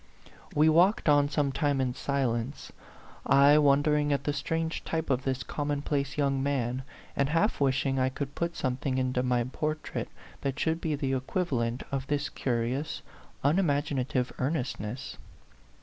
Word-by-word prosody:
We 150 +2 +5
walked 175 +6 +4
on 145 -1 +5
some 145 -2 +1
time 140 0 0
in 130 -2 0
silence, 130 -1 -2 0.5
I 140 +2 +6
won 145 -1 +4
dering 150 -1 +2
at 140 0 0
the 145 - 0
strange 165 +2 -2
type 160 -2 -2
of 130 +1 0
this 130 -2 -1
common 145 -1 -2
place 140 -1 -1
young 140 -2 +1
man, 130 -2 -1 0.3
and 140 0 +1
half 165 +3 +1
wishing 135 0 +2
I 130 0 +2
could 140 +1 -5
put 170 0 -2
something 130 -1 -1
into 130 -1 +1
my 125 -1 +1
portrait 155 +5 -3 0.3
that 140 +1 -2
should 160 +1 0
be 155 -2 0
the 135 -2 -1
equivalent 130 -4 -1
of 135 -1 -2
this 145 +1 -1
curious, 130 +5 -2 0.4
unimag 145 -1 +2
inative 130 -1 -1
earnestness. 125 -4 -3
140 Hz, 155 wpm, -29 LUFS, 130-150 Hz, 0.5 s, I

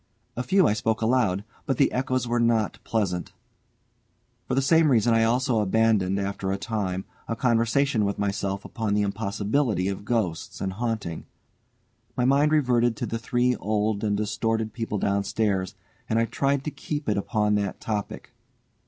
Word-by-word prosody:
A 125 - -2
few 185 +10 +3
I - - +3
spoke 110 +1 -1
aloud, 110 -5 +2 0.2
but 135 - 0
the 140 - +3
echoes 130 -1 -1
were 120 0 +1
not 115 -2 +1
pleasant. 95 -4 -2 1.1
For 130 - -1
the 135 - +3
same 160 +2 +4
reason 120 -2 +3
I 115 0 +4
also 120 +1 +2
abandoned, 105 -2 +2
after 100 -1 -2
a 95 - -1
time, 95 -2 -3 0.2
a 115 - -2
conversation 115 +2 +2
with 100 0 -1
myself 100 -1 -2
upon 110 -3 -2
the 105 - +2
impossibility 100 +1 0
of 100 0 -5
ghosts 100 -7 -2
and 95 -1 -2
haunting. 110 -6 -3 0.9
My 125 - +2
mind 140 +3 +4
reverted 120 -6 +3
to - - -2
the 115 - -3
three 125 +1 +1
old 105 0 -1
and 105 -1 +1
distorted 110 +1 -1
people 115 -3 -3
downstairs, 100 -1 0 0.3
and 110 - +1
I 115 - +3
tried 140 +3 0
to 150 - -3
keep 145 0 -5
it 105 - +2
upon 105 +1 0
that 100 -2 -1
topic. 105 -2 -4
110 Hz, 165 wpm, -25 LUFS, 100-120 Hz, 1.1 s, same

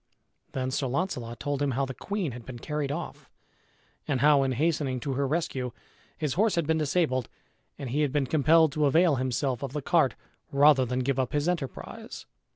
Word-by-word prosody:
Then 130 -1 -2
Sir 135 +1 -1
Launcelot 125 -5 -3
told 145 -1 -2
him 145 - +2
how 135 - +2
the 135 - -6
queen 200 -1 -3
had 120 0 -9
been 125 +1 -8
carried 150 +2 -3
off, 170 +4 -6 0.8
and 135 -3 0
how, 145 -1 +6
in 135 -1 +1
hastening 145 -2 0
to 140 0 -2
her 140 +1 0
rescue, 135 -5 -2 0.4
his 150 -4 -1
horse 215 +3 +2
had 170 -2 +1
been 160 +1 +1
disabled 140 -5 0 0.5
and 130 -4 -5
he 145 +4 +1
had 145 -3 +1
been 145 -1 +1
compelled 155 +2 +4
to 150 0 +1
avail 160 0 +4
himself 130 0 -1
of 135 -1 -5
the 150 - -2
cart 160 -9 +3 0.4
rather 140 -1 +5
than 125 +1 -1
give 135 +1 0
up 130 -2 -1
his 145 +2 0
enterprise. 170 -7 -4
140 Hz, 195 wpm, -28 LUFS, 130-155 Hz, 0.8 s, how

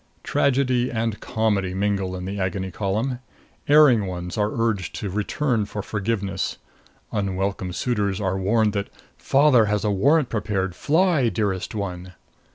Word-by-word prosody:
Tragedy 130 -2 +1
and 115 -2 -2
comedy 105 -5 -1
mingle 100 -2 -1
in 90 0 -6
the 100 +2 -4
Agony 95 0 -2
Column. 110 +7 -2 0.5
Erring 140 -9 +6
ones 90 -1 -5
are 105 -1 +1
urged 115 -5 -1
to 100 - -4
return 110 +3 0
for 105 0 -5
forgiveness; 100 -2 -2 0.5
unwelcome 95 -2 -2
suitors 100 -2 -1
are 95 -2 -1
warned 105 +2 +2
that 100 -1 -2 0.3
"Father 135 -5 +4
has 105 0 -1
warrant 125 +9 +3
prepared; 100 -4 -1
fly, 155 - +2
Dearest 100 -2 -2
One!" 90 -3 -5
105 Hz, 135 wpm, -23 LUFS, 95-115 Hz, 0.5 s, Erring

